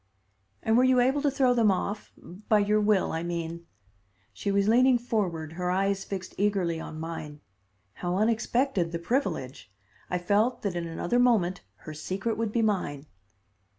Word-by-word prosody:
"And 220 +1 +3
were 250 - +5
you 255 -1 +4
able 265 +4 +2
to 290 - +2
throw 265 -2 +2
them 230 -3 +3
off? 200 +2 -2 0.4
by 215 - +6
your 210 +1 +2
will, 210 -2 +2
I 160 - -2
mean." 170 0 -4 0.7
She 200 - -2
was 200 0 +2
leaning 250 +3 +5
forward, 185 -10 -2
her 180 +1 -2
eyes 195 +1 0
fixed 185 -2 -6
eagerly 190 -5 +1
on 155 -1 -7
mine. 160 -2 -6 0.5
How 175 +6 -3
unexpected 225 -2 +1
the - - 0
privilege! 170 - -2 0.4
I 180 - 0
felt 205 +7 +1
that 200 -4 -2
in 170 -1 -3
another 175 +8 -1
moment 205 -8 +2 0.2
her 155 - -6
secret 190 +8 -3
would 225 -1 -2
be 230 +1 +1
mine. 180 -9 -1
200 Hz, 165 wpm, -27 LUFS, 170-230 Hz, 0.7 s, by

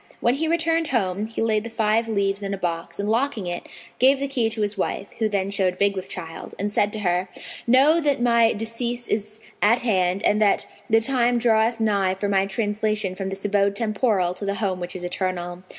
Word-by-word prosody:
When 240 - +2
he 315 +4 -1
returned 330 0 +1
home, 205 -5 -1
he 225 0 -3
laid 215 -2 +1
the 230 - -6
five 225 0 +1
leaves 200 -2 0
in 200 0 -2
a - - -9
box 170 -1 -4
and 200 - -1
locking 230 -2 0
it, 175 0 -5 0.3
gave 265 +2 +5
the 280 - -1
key 250 -5 0
to 220 -1 -3
his 205 0 -1
wife 195 0 -2
(who 220 -1 +1
then 200 -1 -1
showed 190 -2 0
big 200 0 +2
with 190 0 -5
child), 165 -3 -8
and 205 +2 -2
said 205 0 +1
to 215 - -3
her, 180 -1 0 0.4
"Know 275 +7 +5
that 290 -4 +1
my 235 -1 +4
decease 235 +2 -3
is 215 +1 -3 0.2
at 230 +4 +3
hand 190 -4 +1
and 210 +1 +3
that 205 -2 +3 0.2
the 225 0 +4
time 245 0 +2
draweth 230 0 +2
nigh 200 -4 +1
for 205 +2 -2
my 195 -1 +2
translation 210 -1 -1
from 190 0 -5
this 195 +1 -6
abode 200 -1 +2
temporal 215 -5 +1
to 185 - -9
the 200 0 -1
home 195 -4 -2
which 175 +1 -5
is 180 - -6
eternal. 180 -1 -3
210 Hz, 215 wpm, -23 LUFS, 195-230 Hz, 0.4 s, gave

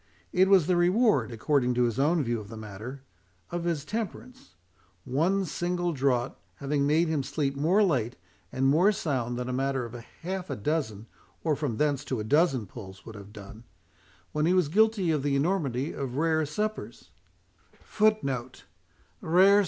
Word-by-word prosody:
"It 185 +1 +4
was 190 -5 +6
the 180 - +2
reward," 175 - +3
according 125 +2 +1
to 125 - +3
his 120 +1 0
own 155 +3 +3
view 120 -2 -1
of 105 - -9
the 115 - -8
matter, 110 +6 -8 0.5
"of 175 0 -3
his 160 -4 -1
temperance; 230 - -6 0.5
one 180 +9 +1
single 175 +1 -1
draught 130 -3 0 0.2
having 140 0 0
made 160 +3 +3
him 155 -3 0
sleep 140 0 -2
more 170 +9 +3
late 125 - 0 0.4
and 130 - 0
more 165 +9 +5
sound 130 - -2
than 125 0 -3
a 125 - -2
matter 135 -1 -1
of 115 - -9
half 180 +10 -6
a 140 - -2
dozen, 115 -4 -2 0.4
or 155 - +2
from 135 -7 -3
thence 145 -1 +1
to 130 - -2
a - - -2
dozen 135 -1 +2
pulls, 95 -2 -11
would 115 - -9
have 100 -1 -11
done, 105 +2 -11 0.7
when 150 +1 +1
he 180 - +3
was 180 -6 +2
guilty 210 -1 +3
of 150 -3 +1
the 140 0 0
enormity 140 -4 0
of 135 -2 -4
rere 160 -1 +1
suppers, 215 +7 -4 0.6
and - - -28
of - - -26
drinking 215 0 +4
deep 135 - +1
after 125 +1 -9 0.6
them." 190 +5 +5
145 Hz, 185 wpm, -28 LUFS, 125-175 Hz, 0.7 s, was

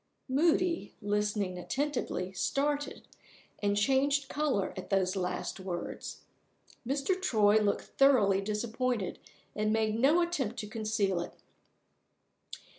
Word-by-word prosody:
Moody, 335 +5 +1
listening 205 -3 -1
attentively, 255 -6 -2
started, 290 +7 -1 0.5
and 205 0 +1
changed 270 +5 +2
color 275 -11 0
at 185 - -7
those 190 -1 +1
last 180 +1 -3
words. 185 -2 -5 0.7
Mr. 285 +8 0
Troy 215 - +4
looked 205 -1 +1
thoroughly 215 -9 +4
disappointed 220 +1 -2 0.4
and 215 0 +1
made 220 -1 +1
no 290 +7 +5
attempt 270 -10 -2
to 210 - -4
conceal 210 -4 0
it. - - -7
220 Hz, 110 wpm, -31 LUFS, 200-275 Hz, 0.7 s, no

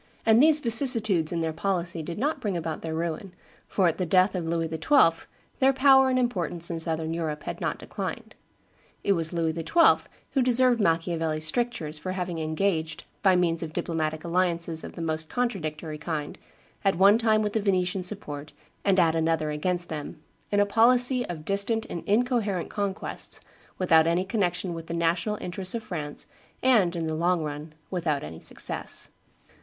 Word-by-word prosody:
And 225 +2 +6
these 310 0 +6
vicissitudes 225 - +4
in 170 -1 -1
their 160 -1 -1
policy 175 -2 -2
did 165 +2 -6
not 290 +1 -1
bring 200 -6 -1
about 160 -1 -4
their 160 -1 -4
ruin, 170 +3 -4 0.3
for 190 -3 +2
at 165 - -1
the 185 - 0
death 185 +3 +4
of 175 -3 -3
Louis 165 0 0
XII. 165 - +3 0.3
their 270 0 +4
power 265 0 +6
and 255 - +1
importance 175 -9 -1
in 165 - -3
Southern 160 0 -1
Europe 155 -3 -3
had - - -6
not - - -1
declined. - - -6 0.7
It - - +2
was 165 -4 0
Louis 165 -2 0
XII. 170 - +3 0.2
who 270 - +2
deserved 250 -1 +3
Machiavelli's 165 -3 0
strictures 160 -5 -2
for 185 +3 -4
having 180 -3 -3
engaged, 160 0 -1 0.2
by 190 -2 +4
means 170 -2 +1
of 160 -2 -6
diplomatic 160 -3 -2
alliances 170 -2 -1
of - - -8
the 170 - -6
most 155 -1 -2
contradictory 160 -10 -3
kind, 155 -2 -4 0.4
at 195 -3 +2
one 200 +5 +5
time 220 -2 +3
with 210 -1 -2
the 220 - +1
Venetians' 185 -2 0
support, 150 -7 -5 0.3
and 195 -1 +3
at 165 -2 +4
another 160 -1 0
against 175 +3 -2
them, 150 -2 -6 0.3
in 205 - +2
a 205 - +5
policy 245 +4 +4
of 155 -3 -7
distant 200 +4 0
and 170 - -5
incoherent 215 -4 0
conquests, 200 -1 -4 0.4
without 165 -3 +4
any 175 +3 +1
connection 185 -3 -1
with 165 -1 -8
the 170 - -4
national 170 +5 0
interests 185 +3 -2
of 230 - -4
France, 150 -7 -6 0.4
and, 215 -9 +4
in 165 -1 -2
the 160 - -2
long 170 +1 +1
run, 150 +1 -6 0.2
without 160 -6 -1
any 80 +1 -8
success. - - -3
175 Hz, 175 wpm, -26 LUFS, 160-205 Hz, 0.7 s, And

